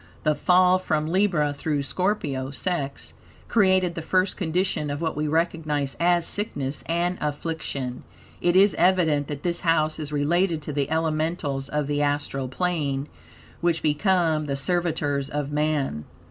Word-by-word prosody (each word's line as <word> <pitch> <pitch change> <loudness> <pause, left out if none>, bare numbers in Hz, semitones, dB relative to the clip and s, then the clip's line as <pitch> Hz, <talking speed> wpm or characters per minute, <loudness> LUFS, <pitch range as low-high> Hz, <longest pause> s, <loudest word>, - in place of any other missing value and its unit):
The 155 - +3
fall, 180 +4 +4
from 155 -4 -1
Libra 170 -4 +1
through 145 0 -2
Scorpio 145 -7 -1
(sex), 140 -1 -3 0.3
created 185 -5 +3
the 165 - -5
first 185 +4 +1
condition 180 -3 -1
of 145 0 -3
what 160 -1 -2
we 150 +1 -1
recognize 155 -3 0
as 175 0 +3
sickness 145 -10 -1
and 175 +2 0
affliction. 145 -4 -3 0.4
It 175 0 +2
is 195 +2 +6
evident 165 -5 +3
that 145 -1 -6
this 175 -1 0
house 155 -2 +1
is 150 -1 -5
related 165 +4 +1
to 150 - -5
the 140 0 -1
elementals 155 -3 -1
of 150 0 -1
the 145 +1 -1
astral 145 -2 -1
plane, 145 -3 -1 0.5
which 170 -1 0
become 160 0 +2
the 140 -1 -2
servitors 145 -2 -1
of 145 -1 -3
man. 150 - -1
155 Hz, 145 wpm, -25 LUFS, 145-175 Hz, 0.5 s, is